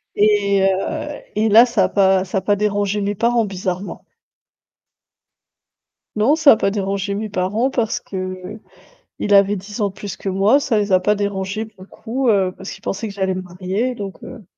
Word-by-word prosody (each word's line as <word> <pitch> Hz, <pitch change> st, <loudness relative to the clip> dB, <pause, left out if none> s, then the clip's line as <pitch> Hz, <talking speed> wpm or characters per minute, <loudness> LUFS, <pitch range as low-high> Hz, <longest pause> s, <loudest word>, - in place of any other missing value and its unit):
et 205 Hz, -2 st, +3 dB
heu, 195 Hz, -, -1 dB
et 215 Hz, +1 st, +2 dB
là 225 Hz, +4 st, +8 dB
ça 225 Hz, -6 st, +1 dB
a -, -, -2 dB
pas 190 Hz, -2 st, +3 dB
ça 190 Hz, +1 st, -1 dB
a -, -, -10 dB
pas 205 Hz, -, +1 dB
dérangé 205 Hz, 0 st, 0 dB
mes 200 Hz, +1 st, -1 dB
parents 235 Hz, +1 st, +2 dB
bizarrement. 190 Hz, 0 st, -5 dB, 2.1 s
Non, 235 Hz, +9 st, +3 dB
ça 315 Hz, -3 st, +6 dB
a 220 Hz, -, +5 dB
pas 195 Hz, -, +1 dB
dérangé 200 Hz, 0 st, -2 dB
mes 215 Hz, +1 st, -4 dB
parents, 205 Hz, +7 st, 0 dB
parce 230 Hz, -3 st, -1 dB
qu'il 185 Hz, +2 st, -6 dB, 0.8 s
avait 200 Hz, +1 st, +5 dB
10 205 Hz, +4 st, -8 dB
ans 205 Hz, -, +2 dB
de 190 Hz, -, -11 dB
plus 200 Hz, -2 st, -7 dB
que 195 Hz, -, -6 dB
moi, 200 Hz, +9 st, +3 dB
ça 230 Hz, -6 st, 0 dB
les 205 Hz, -2 st, -1 dB
a 185 Hz, -, +5 dB
pas 210 Hz, +3 st, +2 dB
dérangé 200 Hz, +1 st, -3 dB
pour 200 Hz, -4 st, -17 dB
le 190 Hz, -, -14 dB
coup, 250 Hz, +3 st, -3 dB
heu, 195 Hz, -4 st, +2 dB
parce 190 Hz, -, -8 dB
qu'ils -, -, -10 dB
pensaient 205 Hz, +3 st, -3 dB
que 200 Hz, -, -9 dB
j'allais 190 Hz, -1 st, -1 dB
me 185 Hz, -, -4 dB
marier, 185 Hz, +7 st, -3 dB
donc 195 Hz, -2 st, -7 dB
heu 235 Hz, -5 st, -10 dB
200 Hz, 200 wpm, -19 LUFS, 190-215 Hz, 2.1 s, là